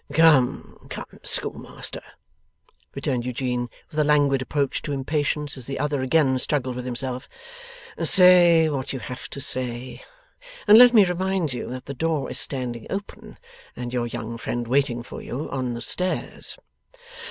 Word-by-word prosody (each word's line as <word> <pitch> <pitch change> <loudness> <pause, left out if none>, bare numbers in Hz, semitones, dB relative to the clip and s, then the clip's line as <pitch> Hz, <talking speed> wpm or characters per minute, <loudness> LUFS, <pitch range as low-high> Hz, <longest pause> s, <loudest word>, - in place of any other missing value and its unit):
'Come, 150 -5 +3
come, - - -6 0.2
Schoolmaster,' - - -1 0.9
returned 125 -3 -1
Eugene, 125 -1 -2 0.2
with 155 - -3
a - - +4
languid 145 -2 +3
approach 140 +1 -1
to 145 - -4
impatience 145 +1 -1
as 125 - -8
the 135 - -4
other 145 -2 -1
again 130 -1 +2
struggled 130 -2 0
with 125 0 -5
himself; 130 +1 -4 0.7
'say 175 -3 +6
what 135 -3 -3
you - - -3
have 125 +3 -8
to - - -7
say. 125 -1 -5 0.7
And 210 +2 +9
let 245 0 +9
me 210 -3 +8
remind 180 -4 -1
you 125 - -5
that 125 +1 -7
the 140 - -6
door 160 +1 -1
is 135 - -2
standing 125 -4 -2
open, 200 +1 -7 0.4
and 125 0 -6
your 120 -1 -1
young 115 -1 -6
friend 120 0 -3
waiting 125 -2 +1
for - - -9
you 135 +5 -5
on 130 -3 -2
the 120 - -6
stairs. 185 +7 -2
135 Hz, 155 wpm, -24 LUFS, 125-155 Hz, 0.9 s, And